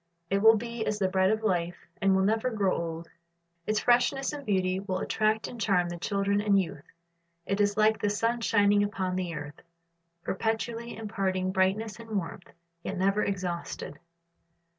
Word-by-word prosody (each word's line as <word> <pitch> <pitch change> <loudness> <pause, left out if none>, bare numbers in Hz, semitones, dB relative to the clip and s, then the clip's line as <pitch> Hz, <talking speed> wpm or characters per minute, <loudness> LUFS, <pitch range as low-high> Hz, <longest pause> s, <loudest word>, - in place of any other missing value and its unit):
It 195 - +3
will 225 +1 +8
be 235 +1 -3
as 210 - -1
the 195 -2 +1
bread 190 0 +2
of 220 +1 0
life, 175 -4 0 0.2
and 195 -1 +4
will 190 - +3
never 220 +5 +1
grow 205 -5 +1
old. 165 0 -4 0.6
Its 215 0 +1
freshness 245 +3 +2
and 290 -1 -6
beauty 185 -4 +1
will 190 -1 -3
attract 215 +3 0
and 235 - -8
charm 180 -5 +2
the 175 0 -6
children 200 +1 0
and 205 -2 +3
youth. 165 -6 -4 0.6
It 200 +1 0
is 205 0 +1
like 215 0 +3
the 205 - +2
sun 230 +3 0
shining 205 -2 +4
upon 190 -3 -1
the 180 -2 -2
earth, 145 0 -8 0.6
perpetually 230 +3 -2
imparting 195 -4 -1
brightness 200 +4 0
and 225 -2 -4
warmth, 175 -1 -6 0.3
yet 195 - -4
never 195 +3 +2
exhausted. 175 -6 -4
200 Hz, 170 wpm, -28 LUFS, 185-220 Hz, 0.6 s, will